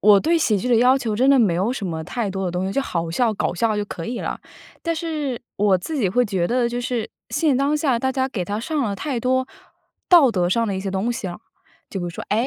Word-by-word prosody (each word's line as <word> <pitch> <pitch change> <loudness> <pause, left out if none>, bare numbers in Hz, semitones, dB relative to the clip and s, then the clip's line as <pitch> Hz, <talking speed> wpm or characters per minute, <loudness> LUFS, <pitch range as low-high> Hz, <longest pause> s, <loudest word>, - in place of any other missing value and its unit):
我 205 -1 +7
对 335 +9 +2
喜 225 -10 +2
剧 225 +6 -2
的 240 - +4
要 250 +3 +5
求 225 -5 -2
真 255 +5 +3
的 275 - +6
没 210 -8 +4
有 190 +7 +1
什 230 -7 -3
么 160 -2 -3
太 215 +4 -3
多 190 -1 -3
的 - - -1
东 180 +2 -2
西， 195 - -2
就 275 - +1
好 170 -10 -3
笑、 230 +6 +1
搞 - - -1
笑 215 +4 +1
就 210 - -1
可 165 -4 -7
以 240 0 -3
了。 - - -4 0.4
但 335 -1 -1
是 305 -6 -3 0.2
我 200 -2 +3
自 250 - -6
己 205 -8 +2
会 245 +6 +2
觉 190 -5 -1
得 245 0 +2
就 240 +1 -2
是， 240 -2 -2 0.2
现 310 -5 +1
当 280 +3 +2
下 275 -6 +1
大 265 +2 0
家 260 0 0
给 230 -8 -3
它 205 +4 -3
上 300 +5 -2
了 205 -6 -1
太 270 -2 -3
多 260 +1 +1 0.6
道 325 -9 +7
德 180 -4 +1
上 230 +5 +1
的 200 - -2
一 190 - -3
些 195 0 -3
东 195 +5 -1
西 215 - -5
了。 175 - -6 0.5
就 195 - -4
比 - - -3
如 175 - -3
说， 170 - -7
哎， 225 +5 +2
230 Hz, 300 characters per minute, -22 LUFS, 195-260 Hz, 0.6 s, 我